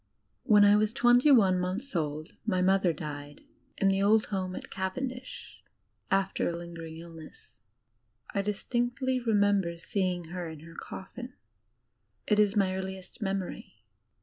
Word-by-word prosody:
When 210 -1 +6
I 205 +1 +6
was 215 +1 +1
twenty 245 +2 +5
one 195 -9 +5
months 190 +8 -3
old 155 -1 -3
my 205 -4 0
mother 190 -1 +3
died, 145 -2 -7 0.4
in 195 - +2
the 195 0 +2
old 210 +2 +4
home 185 -1 -2
at - - -8
Cavendish, 250 +7 -5 0.5
after 195 -2 +1
a 170 - -3
lingering 165 -2 -8
illness. 165 -7 -12 0.7
I 200 - +1
dis 205 0 -3
tincdy 255 +2 0
remember 200 -6 +2
seeing 180 -2 -2
her 180 -2 -4
in 160 -2 -9
her 165 +1 -12
coffin 245 +9 -8 0.9
it 210 - +2
is 210 0 +3
my 190 -2 +2
earliest 190 +3 -6
memory. 195 - -3
195 Hz, 145 wpm, -29 LUFS, 170-215 Hz, 0.9 s, When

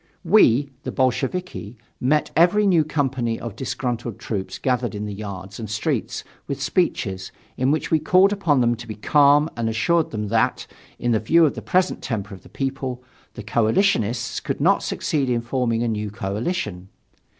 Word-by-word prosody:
We, 145 - +4
the - - -5
Bolsheviki, 130 - -2 0.2
met 150 +4 +1
every 180 +6 +4
new 175 -5 +4
company 130 -6 -1
of 115 -4 -6
disgruntled 120 -3 -3
troops 100 -4 -4
gathered 125 -4 -1
in 105 +1 -4
the 105 - -5
yards 100 -1 -7
and 110 -3 -6
streets, 105 0 -2 0.2
with 140 -1 -3
speeches, 115 - -1 0.2
in 130 +1 +1
which 155 +2 0
we 160 - +4
called 185 +6 +4
upon 160 -10 +2
them 120 0 +3
to 115 - -10
be 110 - -6
calm 145 +6 +4
and 115 -1 -1
assured 165 +9 +1
them 105 -2 -4
that, 110 0 +1 0.3
in 120 -1 +1
view 165 +10 +4
of 150 - +1
the - - -7
present 185 0 +1
temper 105 -4 -4
of 95 - -11
the - - -17
people, 135 -2 -4 0.3
the 115 - -7
coalitionists 115 - +1
could 135 -3 -3
not 185 +7 +3
succeed 145 -8 -1
in 120 -1 +1
forming 120 -1 -1
a - - 0
new 105 -2 -2
coalition. 100 - -3
125 Hz, 175 wpm, -22 LUFS, 110-150 Hz, 0.3 s, We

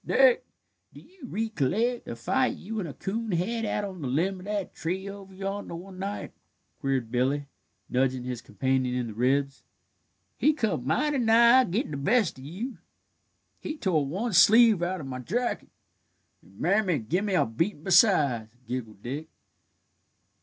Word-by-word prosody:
"Dick, - - +4 0.5
do - - -10
your 355 -8 -13
ricolleck 225 - -1
the - - -6
fight 255 - 0
you 220 +3 -5
and 175 -5 -4
a - - -7
coon 220 +1 -3
had 225 +7 -1
out 210 -1 -1
on 190 -4 -7
the 135 - -3
limb 175 +9 0
of 180 - -11
that 205 -2 -3
tree 185 +4 -3
over 200 -1 -9
yonder, 195 -1 -5
one 185 +2 -10
night?" 200 +2 -4 0.5
queried 135 -5 -1
Billy, 135 +4 +1 0.4
nudging 130 0 0
his 125 -1 -5
companion 130 +4 -1
in 125 -1 -1
the 110 - -6
ribs. 135 +4 0 0.8
"He 305 - +4
come 190 - -1
mighty 290 - +1
nigh 235 +2 +6
gittin' 195 0 -2
the 145 - -3
best 195 - +1
of - - -11
you." 190 - -6 0.8
"He 310 - -5
tore 165 - +1
one 200 - -2
sleeve 215 +2 +7
out 180 0 -1
of - - -7
my 130 -1 -5
jacket, 235 - -2 0.7
and 95 +1 -20
mammy 185 -1 +2
gimme 180 - -1
a - - +4
beatin' 155 - -2
besides," 145 - +3
giggled 110 -5 -5
Dick. 145 +6 -5
185 Hz, 160 wpm, -27 LUFS, 135-220 Hz, 0.8 s, sleeve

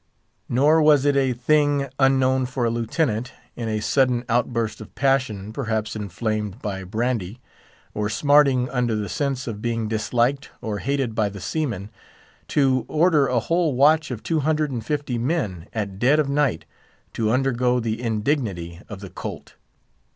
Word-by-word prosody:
Nor 150 +6 +4
was 150 -2 +5
it 145 -1 +3
a 135 -2 +2
thing 145 +3 +2
unknown 130 -1 +3
for 125 -1 -2
a 115 - +1
Lieutenant, 115 0 -1 0.2
in 115 -2 -4
a 110 0 -1
sudden 125 0 +2
outburst 115 -2 0
of 110 - -12
passion, 125 -7 0
perhaps 110 -4 -2
inflamed 105 +1 -3
by 100 -5 -4
brandy, 110 +1 -2 0.5
or 105 0 -1
smarting 140 -1 +4
under 125 -3 0
the 105 -1 -2
sense 135 0 -2
of 105 -3 -5
being 115 -1 -1
disliked 120 +5 0
or 110 -4 -4
hated 135 -2 -1
by 110 -2 +1
the 100 0 -9
seamen, 110 - -3 0.6
to 130 -4 +2
order 155 -3 +3
a 125 -2 +1
whole 165 0 +1
watch 150 +4 +4
of 120 -4 -6
two 165 -2 0
hundred 155 0 0
and 120 -4 -4
fifty 145 -3 -2
men, 115 - -2
at 100 -3 -4
dead 130 +6 +4
of 150 - +2
night, 140 - 0 0.5
to 110 -1 0
undergo 125 0 +2
the 115 0 -2
indignity 105 - -2
of 100 -2 -8
the 100 - -8
"colt." - - -7
125 Hz, 160 wpm, -23 LUFS, 110-140 Hz, 0.6 s, was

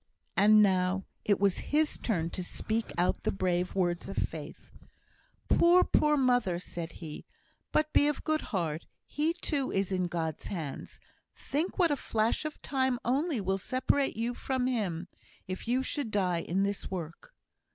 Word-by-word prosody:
And 210 +1 +7
now 185 -1 +2 0.2
it 205 - +2
was 200 -2 +2
his 305 +1 +2
turn 170 -7 -1
to 185 - -3
speak 220 +5 -3
out 175 +1 +1
the - - 0
brave 180 -1 0
words 175 -1 0
of 195 - -6
faith. 155 0 -4 0.8
"Poor, 355 +2 +6
poor 300 0 +3
mother!" 245 -9 +2
said 170 -2 -5
he. 155 -3 -9 0.7
"Be 290 - +5
of 295 - -1
good 310 0 +1
heart. 165 -6 -3 0.2
He, 310 +3 0
too, 295 -6 -2
is 195 0 0
in 185 -1 +1
God's 165 -3 -3
hands. 160 -8 -5 0.4
Think 315 +6 -2
what 345 -4 +4
a - - +3
flash 225 +1 0
of 310 - -5
time 260 -2 +1
only 275 +2 +1
will 195 0 0
separate 260 +4 0
you 235 +2 -1
from 260 +1 -1
him, 195 -9 -1 0.4
if 185 +4 -5
you 255 +2 +2
should 270 -2 -2
die 185 -5 +1
in 190 +4 0
this 200 0 -2
work!" 175 - -7
205 Hz, 160 wpm, -30 LUFS, 180-265 Hz, 0.8 s, And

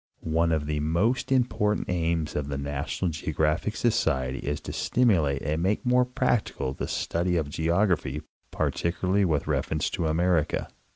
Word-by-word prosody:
One 85 +1 +3
of 80 -2 0
the 75 0 -1
most 90 - 0
important 120 -5 +1
aims 85 -3 -1
of 75 -2 -1
the 70 -1 -3
NATIONAL 70 +5 -2
GEOGRAPHIC 80 +5 -1
Socrery 65 - +1
is 75 0 -3
to - - -6
stimulate 85 - +2
and 75 +3 -1
make 100 +7 0
more 125 0 +4
practical 120 - -1
the - - -4
study 90 +1 0
of 75 -3 -1
geography, 80 -3 +1 0.3
particularly 95 +3 0
with 75 -5 0
reference 75 -2 -1
to 80 - -1
America. 80 0 +1
80 Hz, 150 wpm, -27 LUFS, 75-95 Hz, 0.3 s, more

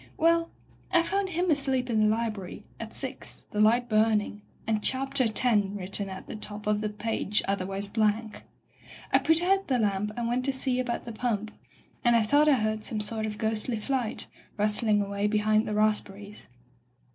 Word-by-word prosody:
"Well, 335 +1 +3 0.4
I 340 -2 +4
found 390 +2 -1
him 355 0 0
asleep 270 -3 +1
in 225 -3 +1
die 215 - +4
library, 215 -5 -4 0.2
at - - -7
six, - - -5
the 210 - -3
light 235 +3 +4
burning, 215 -1 +1 0.2
and 215 -1 0
'Chapter 265 +1 0
X' 225 +3 -1 0.3
written 195 +1 -2
at 190 0 -8
the - - -7
top 210 0 -8
of 210 0 +1
a 210 - 0
page 210 -1 0
otherwise 195 0 -1
blank. 215 +1 0 0.7
I - - +7
put 320 +2 +3
out 390 +2 +2
the 260 - +2
lamp 210 -2 0
and 235 -1 -1
went 245 +2 0
to 275 - +2
see 260 -1 -1
about 245 -2 -2
the 235 - -6
pump, 220 -2 -2 0.5
and 240 -1 +4
I 230 - +4
thought 290 +7 +4
I - - +6
heard 215 -2 -1
some 215 - -2
sort 220 +1 -1
of 210 -1 -5
ghostly 220 +2 -1
flight, 250 -1 -1 0.3
rustling 210 0 +2
away 200 +1 -1
behind 215 +1 +2
the 210 - -2
rasp 215 0 +2
berries. 205 +1 -12
220 Hz, 185 wpm, -28 LUFS, 210-255 Hz, 0.7 s, I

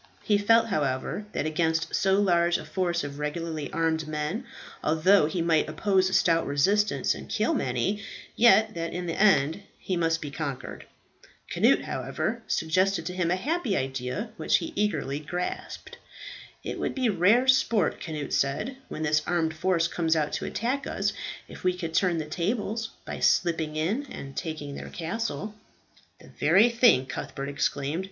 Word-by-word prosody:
He 205 -1 +2
felt, 225 +2 +4
however, 145 +3 -1
that - - -1
against 160 +1 0
so 195 0 +3
large 175 -3 +3
a - - -8
force 175 -2 -1
of 145 0 -6
regularly 155 0 -3
armed 160 -1 0
men, 155 +10 -3 0.4
although 160 +2 +4
he 165 +2 -2
might 165 -2 +2
oppose 190 -3 +2
a - - -5
stout 165 -2 +3
resistance 200 +10 +2
and - - -10
kill - - +1
many, 205 +1 -1 0.3
yet 220 -2 +5
that 165 0 -4
in 180 0 -3
the 165 - -2
end 175 -4 +3 0.2
he 185 - -3
must 165 -1 +1
be 145 -3 -6
conquered. 140 -4 -5 0.7
Cnut, - - +3
however, - - -3
suggested 185 +2 +1
to 180 - -3
him 180 -2 0
a 180 - +2
happy 255 - -1
idea, 135 - -3
which - - +3
he 325 0 -5
eagerly 150 -9 -1
grasped. 175 +4 -5 0.7
"It - - -5
would - - -2
be 260 -2 +1
rare 215 +6 +4
sport," 235 -8 +3
Cnut 155 -4 -5
said, 140 - 0
"when 155 - -5
this 150 0 +2
armed 165 -2 +1
force 170 0 +1
comes 165 -2 0
out 150 -2 0
to - - -2
attack 260 +5 -2
us, - - -1 0.3
if - - -12
we 180 0 +1
could 165 -3 -5
turn 180 -2 +2
the 155 - -2
tables 210 +7 -2 0.2
by - - -5
slipping 160 -3 +2
in, 205 - -1
and 135 - -9
taking 155 -4 -5
their - - -7
castle." 210 +4 -4 0.7
"The - - -16
very 225 +5 +4
thing," 235 - +5
Cuthbert 135 +1 -5
exclaimed. 140 +2 -1
170 Hz, 165 wpm, -27 LUFS, 155-205 Hz, 0.7 s, yet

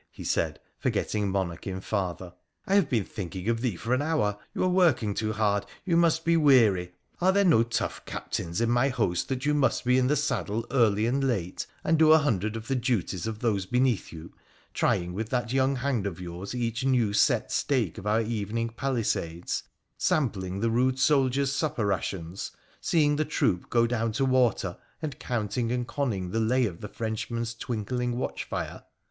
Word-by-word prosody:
' - - -51
he - - -10
said, - - 0 0.2
forgetting 105 -2 0
monarch 95 -3 -2
in 95 -1 -3
father, 95 -3 -3 0.2
' - - -46
I 195 - -1
have 195 -7 +4
been 115 -5 +1
thinking 95 -1 -6
of 115 -1 0
thee 120 -6 0
for 115 +8 -2
an 130 - +2
hour. 145 -10 0 0.2
You - - 0
are - - +3
working 170 - +3
too 110 +1 -1
hard; 105 -2 +1 0.2
you 175 -3 +1
must 165 -1 +3
be 170 0 +4
weary. 110 - +4 0.3
Are 185 +2 +5
there 200 +1 +3
no 160 -11 +5
tough 120 0 -2
captains 85 +3 -4
in 115 - +2
my 120 +3 +3
host 105 -9 -1
that 130 0 -2
you 150 - +3
must 145 -3 +1
be 125 +1 +4
in 125 - +2
the 150 - +3
saddle 115 -6 -1
early 110 -5 +3
and 135 +4 +1
late, 100 -9 -1 0.2
and 160 0 +2
do 155 -1 +7
a - - +8
hundred 110 - 0
of 115 0 -6
the 135 - 0
duties 115 - -1
of 110 -1 -5
those 100 -6 0
beneath 125 0 +1
you, 80 0 -10 0.4
trying 90 0 +1
with 110 +3 -4
that 120 -1 -1
young 135 +1 +2
hand 125 -6 -1
of 90 -4 -6
yours 90 +5 -6
each 120 +1 -2
new 125 -6 +2
set - - +2
stake 120 - 0
of 100 - -7
our 110 +2 +3
evening 115 +1 -2
palisades, 115 -9 -2 0.4
sampling 100 -9 0
the 115 0 +1
rude 130 +2 +2
soldiers' 135 -1 +2
supper 140 -7 -1
rations, 95 -2 -3 0.3
seeing 150 -3 +2
the 155 - +2
troop 90 - 0
go 115 -1 +3
down 115 -1 0
to 135 +4 +1
water, 125 -8 +1 0.2
and 150 -5 -5
counting 115 0 -2
and 125 -1 -1
conning 105 -12 -2
the 115 - 0
lay 125 +3 +2
of 90 -6 -5
the 105 - -6
Frenchman's 115 +1 -3
twinkling 120 +2 -3
watch 130 - -3
fire - - -5
115 Hz, 195 wpm, -27 LUFS, 100-130 Hz, 0.4 s, a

